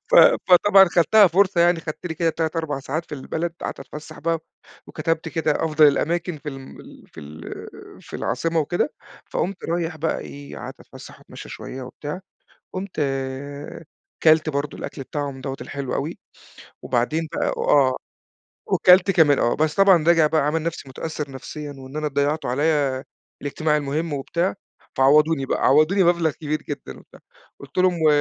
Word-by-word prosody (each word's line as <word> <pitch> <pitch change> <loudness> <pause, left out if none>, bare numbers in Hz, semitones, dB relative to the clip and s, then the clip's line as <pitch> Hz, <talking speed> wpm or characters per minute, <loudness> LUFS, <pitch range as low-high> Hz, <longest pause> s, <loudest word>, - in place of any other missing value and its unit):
ف - - +3 0.3
فطبعًا 195 +2 +7
خدتها 190 +5 +5
فُرصة 185 0 +3
يعني، 170 0 +4
خدت 160 +2 -6
لي 160 - -4
كده 165 0 +1
3 160 0 -2
4 155 -4 -2
ساعات 155 +5 -3
في - - -6
البلد، 160 +4 -4
قعدت - - -5
أتفسّح 150 +2 -10
بقى، 165 +1 0 0.5
وكتبت 160 +1 -2
كده 160 -2 0
أفضل 155 -1 +5
الأماكن 165 +3 -1
في 145 +1 -8
الم 135 -2 -9
ال - - -15
في - - -12
ال 75 +2 -11 0.6
في - - -8
العاصمة 165 -1 -1
وكده، 175 - -1 0.4
فقُمت 190 0 -3
رايح 165 -1 -2
بقى 160 +1 -1
إيه 140 0 -10
قعدت - - -9
أتفسّح - - -13
وأتمشّى - - -12
شوية 130 - -8
وبتاع، 145 +7 -7 0.5
قُمت 185 -3 -4 1.2
كلت 155 0 +5
برضه 140 0 -3
الأكل - - -7
بتاعهم 140 -1 -5
دوّة 135 0 -4
الحلو 140 -2 -5
أوي، 150 +5 -3 0.6
وبعدين 150 +7 -1
بقى - - 0
وآه، 130 -3 +3 0.7
وكَلت 185 +2 +5
كمان 160 -7 +4
آه، 120 - +2
بس 155 0 +1
طبعًا 195 -5 +5
راجع 165 -2 +5
بقى 155 0 +2
عامل 155 +3 0
نفسي 165 -4 -4
مُتأثّر 150 +2 -5
نفسيًّا، 145 +2 -8
وإن 135 +2 -10
أنا 155 0 -1
ضيّعتوا 145 +1 -1
عليّا 140 -1 +1 0.4
الاجتماع 150 +2 0
المُهمّ 150 +3 -2
وبتاع، 170 +6 -1 0.4
فعوَّضُوني 145 +2 +4
بقى - - -1
عوضوني 155 +8 +4
مبلغ 170 -2 +3
كبير 150 +1 -4
جدًا 145 -2 -7
وبتاع، - - -18 0.4
قُلت 140 +5 -9
لهم 180 -2 +2
و - - +4
155 Hz, 160 wpm, -22 LUFS, 140-170 Hz, 1.2 s, فطبعًا